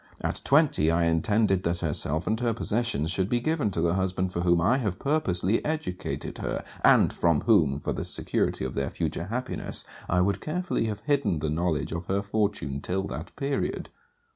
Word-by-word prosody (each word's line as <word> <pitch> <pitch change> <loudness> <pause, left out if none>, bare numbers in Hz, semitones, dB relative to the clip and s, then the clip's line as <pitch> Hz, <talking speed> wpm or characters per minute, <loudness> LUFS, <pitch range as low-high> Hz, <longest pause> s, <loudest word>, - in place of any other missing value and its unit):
At - - -2
twenty, 140 - +4
I 85 +1 +2
intended 95 +4 +2
that 85 -1 -1
herself 80 0 0
and 110 +1 0
her 120 -2 0
possessions 115 -9 0
should 95 +2 +1
be 120 - +2
given 150 -2 0
to 85 -4 -2
the 85 0 +2
husband 95 -1 -1
for 85 - -1
whom 85 -1 +3
I 115 +11 +3
have 100 -7 -2
purposely 110 - 0
educated 150 -13 -4
her; - - -3 0.2
and - - +5
from 85 -4 +2
whom, 80 - +3
for - - -2
the - - -3
security - - -1
of 65 - -4
their 70 0 -1
future 85 - -3
happiness, 125 +6 -2 0.2
I 90 +1 +3
would 100 +1 +1
carefully 175 -5 -1
have 105 -1 -3
hidden 140 - +1
the 75 0 -2
knowledge 80 -1 -1
of 85 +1 -4
her 100 +1 0
fortune 100 -10 -1
till 95 +4 -2
that 75 +7 -7
period. 140 0 -2
95 Hz, 190 wpm, -27 LUFS, 85-115 Hz, 0.2 s, and